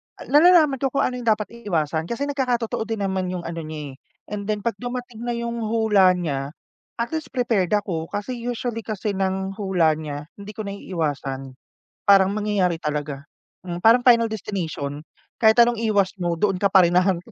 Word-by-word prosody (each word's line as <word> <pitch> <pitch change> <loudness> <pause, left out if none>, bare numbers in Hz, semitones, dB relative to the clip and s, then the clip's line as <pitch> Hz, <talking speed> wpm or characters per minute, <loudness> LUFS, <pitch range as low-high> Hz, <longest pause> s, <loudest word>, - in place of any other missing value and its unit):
a - - -11
nalalaman 305 -3 +6
ko 270 - +1
kung - - +3
ano 250 0 -1
'yung 235 - -8
dapat 215 -1 +1
iiwasan 160 -6 -1
kasi 235 +4 -3
nagkakatotoo 245 -6 -1
din 220 -3 -2
naman 190 -1 -1
'yung 180 -1 -4
ano 165 0 -5
niya, 155 -3 -6
eh. - - -12 0.4
And 205 -1 -4
then 210 -1 -2
pag 230 -4 -2
dumating 245 -1 -6
na 240 - -1
'yung 235 0 -3
hula 215 -4 +3
niya, 145 -4 -3 0.4
at 235 0 -3
least 315 -1 -3
prepared 220 -6 +1
ako. 175 -6 -2
Kasi 235 +7 -4
usually 240 -1 -3
kasi 215 -1 -3
ng 190 0 -1
hula 185 -5 +2
niya, 145 -1 -5 0.2
hindi 200 +1 -9
ko 215 - -4
naiiwasan. 145 -9 -4 0.5
Parang 195 0 +5
mangyayari 205 -5 +1
talaga. 150 -3 -4 0.4
Mm, 175 -1 -5
parang 230 +6 +5
Final 235 -2 +5
Destination, 170 -9 -4 0.4
kahit 220 -1 +5
anong 235 -1 0
iwas 205 -4 +2
mo 175 -1 0
doon 195 +2 0
ka 200 - +3
pa 190 -1 +6
rin 170 - +3
hahantong. 180 -2 -1
200 Hz, 185 wpm, -23 LUFS, 170-230 Hz, 0.5 s, nalalaman